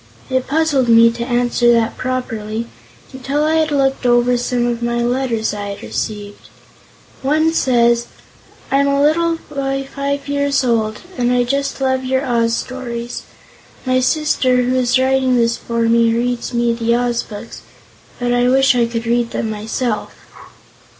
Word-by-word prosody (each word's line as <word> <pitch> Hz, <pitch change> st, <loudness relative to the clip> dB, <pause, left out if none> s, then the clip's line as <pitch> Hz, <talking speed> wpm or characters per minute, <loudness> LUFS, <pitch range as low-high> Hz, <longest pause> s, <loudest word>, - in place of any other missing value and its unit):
It 260 Hz, 0 st, 0 dB
puzzled 290 Hz, -4 st, +1 dB
me 230 Hz, 0 st, +6 dB
to 235 Hz, 0 st, -5 dB
answer 240 Hz, -1 st, +2 dB
that 230 Hz, -1 st, +1 dB
properly, 230 Hz, -3 st, -3 dB, 0.5 s
until 275 Hz, +3 st, -2 dB
I 315 Hz, +1 st, +2 dB
had 315 Hz, -1 st, +2 dB
looked 270 Hz, -2 st, 0 dB
over 240 Hz, 0 st, +3 dB
some 245 Hz, 0 st, -1 dB
of 240 Hz, -1 st, -1 dB
the 235 Hz, 0 st, -1 dB
letters 240 Hz, -2 st, -1 dB
I 205 Hz, -1 st, -5 dB
have 200 Hz, 0 st, -7 dB
received. 205 Hz, -1 st, -5 dB, 0.7 s
One 310 Hz, +4 st, +2 dB
says: 235 Hz, -4 st, +2 dB, 0.6 s
"I'm 280 Hz, +1 st, +3 dB
a 280 Hz, 0 st, +1 dB
little 330 Hz, +3 st, +2 dB
boy 275 Hz, -1 st, -3 dB
5 280 Hz, 0 st, -2 dB
years 280 Hz, -1 st, 0 dB
old, 220 Hz, -3 st, 0 dB, 0.2 s
and 245 Hz, 0 st, +2 dB
I 250 Hz, 0 st, +3 dB
Just 275 Hz, +3 st, -2 dB
love 260 Hz, -1 st, 0 dB
your 260 Hz, +1 st, 0 dB
Oz 230 Hz, -2 st, +1 dB
stories. 240 Hz, -2 st, -5 dB, 0.6 s
My 255 Hz, 0 st, +2 dB
sister, 255 Hz, -2 st, +1 dB
who 250 Hz, +1 st, 0 dB
is 250 Hz, 0 st, +2 dB
writing 260 Hz, 0 st, +2 dB
this 230 Hz, 0 st, +2 dB
for 235 Hz, 0 st, -2 dB
me, 230 Hz, 0 st, +3 dB
reads 240 Hz, 0 st, -2 dB
me 235 Hz, -1 st, +1 dB
the 230 Hz, 0 st, 0 dB
Oz 240 Hz, -1 st, 0 dB
books, 210 Hz, +2 st, -10 dB, 0.6 s
but 245 Hz, 0 st, -1 dB
I 245 Hz, 0 st, +2 dB
wish 270 Hz, +1 st, +4 dB
I 235 Hz, -1 st, +2 dB
could 230 Hz, 0 st, -4 dB
read 235 Hz, 0 st, +1 dB
them 220 Hz, -2 st, -3 dB
myself." 215 Hz, +1 st, -3 dB
245 Hz, 160 wpm, -17 LUFS, 235-270 Hz, 0.7 s, me